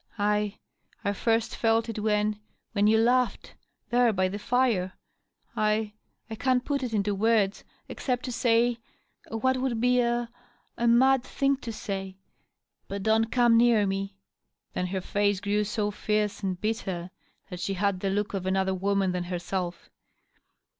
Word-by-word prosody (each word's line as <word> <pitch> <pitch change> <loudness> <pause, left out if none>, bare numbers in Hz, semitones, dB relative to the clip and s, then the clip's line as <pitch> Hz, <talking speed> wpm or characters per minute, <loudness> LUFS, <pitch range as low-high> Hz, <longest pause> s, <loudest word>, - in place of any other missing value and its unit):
" - - -30
I 210 0 0 0.2
— - - -36
I 200 - +1
first 225 +2 0
felt 225 0 +2
it 225 -2 -4
when 210 0 0 0.2
— - - -42
^when 205 +1 +4
you 220 - +5
laughed, 245 +2 +1 0.4
there 240 -1 +4
by 185 -2 +1
the 205 +2 -5
fire. 225 -6 +1 0.6
1 215 0 0 0.2
— - - -49
I 225 - -6
can't 255 -1 +1
put 280 -2 -1
it 250 -3 -3
into 205 -1 0
words, 210 -1 +1 0.2
except 250 -2 -3
to 255 - -3
say 235 0 +2 0.5
what 260 +4 +1
would 255 -3 -1
be 250 +1 +3
a 240 0 +1 0.3
— - - -41
a 235 - +2
mad 260 +3 +5
thing 275 +1 +1
to 240 -3 -6
say. 195 -3 -5
•. - - -42 0.7
But 200 0 -5
don't 220 +1 +2
come 240 -2 +4
near 230 -3 +4
me." 195 0 -3 0.6
Then 180 - -1
her 190 +1 -3
face 205 +1 0
grew 205 +1 0
so 210 0 -1
fierce 210 0 -1
and 190 -3 -2
bitter 190 -5 -3 0.4
that 180 - -6
she 195 +2 -2
had 200 0 0
the 195 - -1
look 205 +2 -1
of 190 -2 -3
another 190 0 +1
woman 195 0 +1
than 180 -1 -2
herself. 175 0 -4
210 Hz, 175 wpm, -27 LUFS, 195-235 Hz, 0.7 s, you